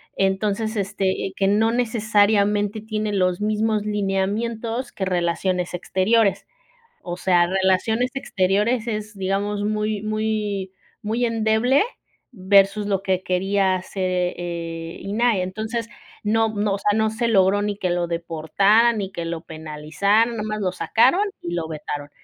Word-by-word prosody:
Entonces, 205 Hz, +3 st, 0 dB
este, 195 Hz, -1 st, -1 dB, 0.2 s
eh, 190 Hz, -, -9 dB
que 195 Hz, -, +1 dB
no 220 Hz, +3 st, +3 dB
necesariamente 210 Hz, -3 st, +2 dB
tiene 215 Hz, -1 st, -3 dB
los 185 Hz, -1 st, +1 dB
mismos 215 Hz, 0 st, 0 dB
lineamientos 215 Hz, +4 st, -2 dB
que 190 Hz, -, -3 dB
Relaciones 180 Hz, 0 st, -1 dB
Exteriores, 195 Hz, +4 st, +1 dB, 0.5 s
o 175 Hz, -1 st, -5 dB
sea, 175 Hz, -1 st, +3 dB
Relaciones 190 Hz, +6 st, +1 dB
Exteriores, 210 Hz, +1 st, 0 dB
es, 215 Hz, -1 st, -4 dB
digamos, 200 Hz, +2 st, -1 dB
muy 210 Hz, 0 st, -1 dB
muy 215 Hz, -3 st, -2 dB, 0.3 s
muy 225 Hz, +3 st, -1 dB
endeble 230 Hz, -, +2 dB, 0.5 s
versus 200 Hz, 0 st, +3 dB
lo 195 Hz, -2 st, 0 dB
que 185 Hz, -1 st, 0 dB
quería 190 Hz, +1 st, +1 dB
hacer 185 Hz, +1 st, -6 dB
eh, 180 Hz, -1 st, 0 dB
eh, 165 Hz, -1 st, -5 dB
INAH, 215 Hz, +3 st, +1 dB
entonces, 220 Hz, +5 st, -4 dB, 0.4 s
no 225 Hz, +1 st, +2 dB
no, 205 Hz, -1 st, -1 dB
o -, -, -2 dB
sea, 205 Hz, -, +1 dB
no 220 Hz, 0 st, +2 dB
se 235 Hz, +2 st, -1 dB
logró 200 Hz, -1 st, +3 dB
ni 205 Hz, -1 st, -2 dB
que 185 Hz, -3 st, -1 dB
lo 175 Hz, -1 st, 0 dB
deportaran, 195 Hz, +8 st, +2 dB
ni 195 Hz, -1 st, -4 dB
que 170 Hz, -, -4 dB
lo 165 Hz, -1 st, -4 dB
penalizaran, 160 Hz, +8 st, 0 dB
nada 230 Hz, -2 st, -4 dB
más 215 Hz, 0 st, -3 dB
lo 185 Hz, -2 st, 0 dB
sacaron 230 Hz, -, +3 dB, 0.2 s
y 170 Hz, -, -4 dB
lo 165 Hz, -2 st, -2 dB
vetaron, 150 Hz, -2 st, -6 dB
205 Hz, 145 wpm, -22 LUFS, 185-220 Hz, 0.5 s, no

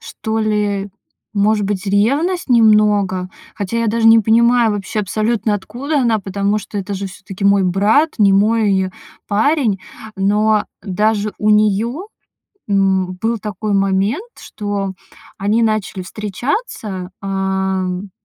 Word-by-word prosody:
что 220 Hz, -1 st, -4 dB
ли, 205 Hz, -2 st, -1 dB, 0.4 s
может 210 Hz, 0 st, +2 dB
быть, 195 Hz, -1 st, -3 dB
ревность 280 Hz, -, +1 dB
немного. 210 Hz, -5 st, +3 dB, 0.3 s
Хотя 205 Hz, +3 st, -3 dB
я 230 Hz, -, 0 dB
даже 225 Hz, +1 st, +3 dB
не 225 Hz, 0 st, +8 dB
понимаю 230 Hz, +1 st, +3 dB
вообще 205 Hz, +1 st, -4 dB
абсолютно 215 Hz, +2 st, 0 dB
откуда 275 Hz, +9 st, -2 dB
она, 230 Hz, -3 st, +2 dB
потому 200 Hz, +1 st, -1 dB
что 210 Hz, 0 st, -9 dB
это 200 Hz, 0 st, -3 dB
же 195 Hz, 0 st, -4 dB
всё-таки 190 Hz, +1 st, -8 dB
мой 200 Hz, -1 st, +4 dB
брат, 205 Hz, -, +2 dB
не 200 Hz, -2 st, +5 dB
мой 200 Hz, -2 st, +2 dB, 0.4 s
парень. 220 Hz, 0 st, +1 dB, 0.4 s
Но 210 Hz, +2 st, +2 dB, 0.2 s
даже 210 Hz, +1 st, 0 dB
у 210 Hz, -, +2 dB
неё, 215 Hz, -, +1 dB, 0.6 s
м, 190 Hz, -2 st, +1 dB
был 230 Hz, +1 st, 0 dB
такой 210 Hz, 0 st, -4 dB
момент, 195 Hz, -, +1 dB
что 205 Hz, -4 st, -4 dB, 0.4 s
они 210 Hz, +4 st, +1 dB
начали 215 Hz, -3 st, -1 dB
встречаться, 210 Hz, -, -4 dB
а, 190 Hz, -1 st, -1 dB
м, 185 Hz, +2 st, -4 dB
210 Hz, 130 wpm, -17 LUFS, 195-225 Hz, 0.6 s, не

